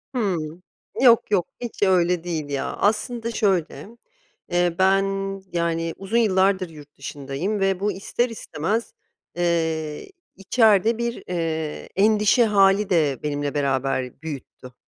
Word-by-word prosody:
Hıı. 175 -7 -2 0.4
Yok, 235 -4 +5
yok, 180 -4 +2
hiç 235 -4 -4
öyle 180 -3 +3
değil 160 -4 -4
ya. 140 -1 -2
Aslında 230 +2 0
şöyle, 195 -6 0 0.6
eee, 175 -1 +1
ben 195 +1 +4 0.5
yani 165 -1 -1
uzun 195 +4 -2
yıllardır 190 -4 +2
yurt 150 -2 -14
dışındayım 145 +9 -4
ve 195 -1 +1
bu 205 +2 0
ister 205 +6 -2
istemez, 220 0 -3 0.4
ııı, 160 -3 -1 0.3
içeride 220 +2 +3
bir, 235 0 -3
iii, 160 -3 -3
endişe 215 +3 +4
hâli 200 -1 +3
de 150 -7 +2
benimle 145 -1 -2
beraber 135 -2 -1
büyüttü. 135 -4 -8
180 Hz, 120 wpm, -23 LUFS, 155-210 Hz, 0.6 s, Yok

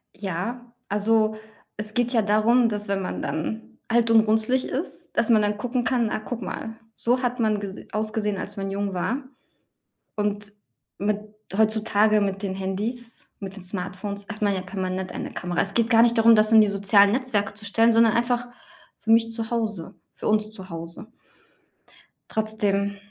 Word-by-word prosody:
Ja. 210 +6 -4 0.2
Also, 215 +1 +2 0.4
es 210 0 -4
geht 245 0 +1
ja 230 - +4
darum, 215 +4 +3
dass 210 -1 -3
wenn 195 -1 -1
man 185 - -4
dann 220 +8 -4
alt 230 0 +2
und 225 - +7
runzlig 220 +4 +2
ist, 290 +7 -4
dass 230 - +2
man 220 -2 +5
dann 205 0 0
gucken 245 +3 -1
kann: 240 -3 +1
„Ach, - - -2
guck 245 -1 -5
mal, 225 +3 -5 0.2
so 245 +2 +1
hat 245 0 -1
man 215 -2 +2
ges 200 -1 -6
ausgesehen, 215 -1 -1
als 205 +2 -6
man 195 0 -3
jung 200 0 -2
war.“ 240 +10 -2 0.9
Und 205 0 -2 0.5
mit 205 +1 0 0.4
heutzutage 215 -1 +3
mit 195 0 -2
den 195 -2 -2
Handys, 215 +5 -4
mit 195 -1 -7
den 195 - -10
Smartphones, 195 +2 -5
hat 215 0 -7
man 205 -1 +2
ja 185 - -2
permanent 185 -1 -4
eine - - -6
Kamera. 175 0 -3
Es 195 0 -2
geht 230 -1 +2
gar 230 -2 +6
nicht 235 0 +3
darum, 225 0 +7
das 215 +1 +4
in 220 -1 +8
die 210 - +4
sozialen 200 0 +4
Netzwerke 225 -6 0
zu 210 0 -4
stellen, 225 +3 +4
sondern 225 -1 +5
einfach 245 +1 0 0.5
für 225 - -1
mich 230 0 +4
zu 225 -1 -4
Hause, 215 -7 -3 0.2
für - - -5
uns 215 0 +2
zu 190 -3 -10
Hause. 170 +5 -8 1.2
Trotzdem 205 -2 0
215 Hz, 180 wpm, -24 LUFS, 200-230 Hz, 1.2 s, in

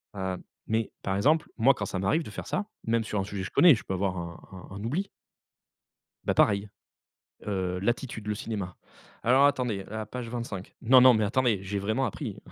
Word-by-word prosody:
Heu» 95 -1 -2 0.3
mais 110 0 0
par 95 0 -1
exemple, 155 +9 +3
moi, 130 +4 +5
quand 105 - -4
ça 95 - -3
m'arrive 150 - +1
de - - -9
faire - - -7
ça, 205 - -2 0.2
même 115 0 +1
sur 105 -2 -2
un 95 - 0
sujet 100 -1 -5
que 95 - -3
je - - -13
connais, 170 -5 +7
je 110 - -8
peux 95 - -4
avoir 95 -1 -1
un 85 -1 -6 0.3
un - - -8
un 100 - -6
oubli 165 - -1 1.2
bah, - - +1
pareil, 100 0 +3 0.8
heu, 95 -3 -2
l'attitude, 120 0 -2
le 105 - 0
cinéma. 100 -4 -4 0.5
«Alors 130 +4 +5
attendez, 125 -8 +1
à 110 - -6
la 110 - -3
page 120 +2 -6
25. 115 -6 -6
Non 125 +2 +7
non, 130 0 +8
mais 110 -2 +2
attendez, 115 -1 +2
j'ai 100 +1 -3
vraiment 110 +7 0
appris. 115 - -5
110 Hz, 210 wpm, -28 LUFS, 100-125 Hz, 1.2 s, non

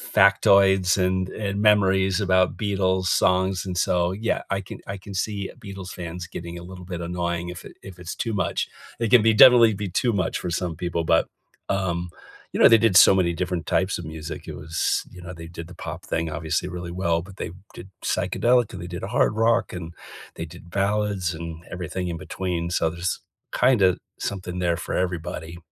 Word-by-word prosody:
factoids 95 -1 +5
and 95 0 +1
and 100 -1 -3
memories 95 -2 +3
about 95 -1 +2
Beatles 95 -3 0
songs, 95 0 +2
and 90 -1 -4
so, 90 0 +2
yeah, 110 +4 -1
I 100 0 0
can 95 - -10
I 100 0 -4
can 100 +1 -10
see 100 0 -2
Beatles 100 -3 -8
fans 85 0 -6
getting 85 0 -7
a - - -10
little 90 0 -10
bit 90 -2 -5
annoying 85 0 -2
if 90 0 -8
it - - -13
if 95 -2 -11
it's 90 0 -6
too 115 -2 -2
much. 95 -4 -1 0.3
It 115 -2 0
can 125 -3 +8
be 115 -1 +5
definitely 115 -1 +8
be 100 -1 -4
too 115 +6 +1
much 90 -4 -1
for 90 - -4
some 85 -2 -2
people, 85 0 -2
but, 80 0 +3 0.4
um, 90 -3 -1 0.4
you - - -2
know, - - +9
they 115 - +8
did 115 -5 +3
so - - +9
many 90 -3 +2
different 90 0 -3
types 95 0 +1
of 85 - -7
music, 80 -1 -7
it - - -6
was 80 +2 -1
you 90 - -12
know, 90 +1 -8
they 85 0 -9
did 85 -1 -8
the 90 - -12
pop - - -7
thing 80 0 -2
obviously 80 +3 -2
really 90 -1 -6
well, 85 -2 0
but 95 +2 -13
they - - -5 0.2
did 95 - -10
psychedelic, 120 -2 +1
and 90 - -7
they 85 - -6
did 90 +1 -6
a - - -3
hard 110 -1 +2
rock, 115 -1 +2
and 85 -2 -6 0.4
they 80 - -5
did 85 +1 -13
ballads 100 -3 0
and 85 0 -7
everything 90 0 -4
in 85 -1 -3
between, 90 -2 -3
so, 80 -1 +1
there's, 85 +2 -3 0.4
kinda, 105 -8 +4 0.2
something 90 -2 -4
there 85 -2 +1
for - - -5
everybody. 85 -2 -3
90 Hz, 205 wpm, -24 LUFS, 85-100 Hz, 0.4 s, know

